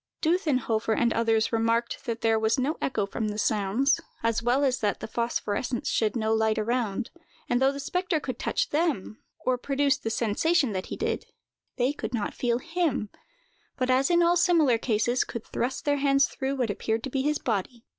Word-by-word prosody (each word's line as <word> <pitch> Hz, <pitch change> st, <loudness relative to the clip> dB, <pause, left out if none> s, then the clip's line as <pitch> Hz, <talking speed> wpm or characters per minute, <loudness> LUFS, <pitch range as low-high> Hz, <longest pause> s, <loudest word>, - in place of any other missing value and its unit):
Dutthenhofer 255 Hz, -, +1 dB
and 235 Hz, -1 st, +2 dB
others 225 Hz, -1 st, +1 dB
remarked 230 Hz, +1 st, 0 dB
that 230 Hz, -1 st, -3 dB
there 225 Hz, -1 st, +3 dB
was 220 Hz, +4 st, +2 dB
no 275 Hz, +5 st, 0 dB
echo 220 Hz, -6 st, 0 dB
from 215 Hz, +2 st, -3 dB
the 210 Hz, 0 st, -4 dB
sounds, 215 Hz, +7 st, +1 dB, 0.2 s
as 230 Hz, -1 st, +1 dB
well 245 Hz, +4 st, +2 dB
as 260 Hz, -2 st, +1 dB
that 205 Hz, -2 st, 0 dB
the -, -, -5 dB
phosphorescence 235 Hz, +1 st, -2 dB
shed 215 Hz, 0 st, +1 dB
no 220 Hz, -1 st, +1 dB
light 220 Hz, 0 st, +2 dB
around; 235 Hz, 0 st, -1 dB, 0.4 s
and 245 Hz, +1 st, +1 dB
though 265 Hz, +1 st, +4 dB
the 280 Hz, -, -7 dB
spectre 360 Hz, +3 st, -1 dB
could 255 Hz, -4 st, -5 dB
touch -, -, -1 dB
them, 290 Hz, -, -1 dB, 0.2 s
or 255 Hz, -1 st, +1 dB
produce 280 Hz, +1 st, +1 dB
the 225 Hz, -, -3 dB
sensation 250 Hz, -, +1 dB
that 185 Hz, -1 st, -3 dB
he -, -, -5 dB
did, -, -, -2 dB, 0.5 s
they 255 Hz, +2 st, +1 dB
could 240 Hz, -4 st, -4 dB
not 210 Hz, -3 st, -2 dB
feel 235 Hz, -1 st, 0 dB
him: 325 Hz, -, -1 dB, 0.7 s
but, 255 Hz, -1 st, +1 dB
as 265 Hz, +2 st, +3 dB
in 345 Hz, 0 st, +4 dB
all 340 Hz, +1 st, +4 dB
similar 320 Hz, -9 st, +4 dB
cases, 240 Hz, +2 st, +1 dB
could 235 Hz, -, -7 dB
thrust 255 Hz, +3 st, -3 dB
their 290 Hz, -1 st, +2 dB
hands 275 Hz, 0 st, +4 dB
through 270 Hz, +1 st, -3 dB
what 245 Hz, -5 st, 0 dB
appeared 220 Hz, +3 st, -2 dB
to 265 Hz, -, -5 dB
be 270 Hz, -, 0 dB
his 300 Hz, +2 st, +1 dB
body. 230 Hz, +1 st, -3 dB
245 Hz, 195 wpm, -27 LUFS, 220-275 Hz, 0.7 s, though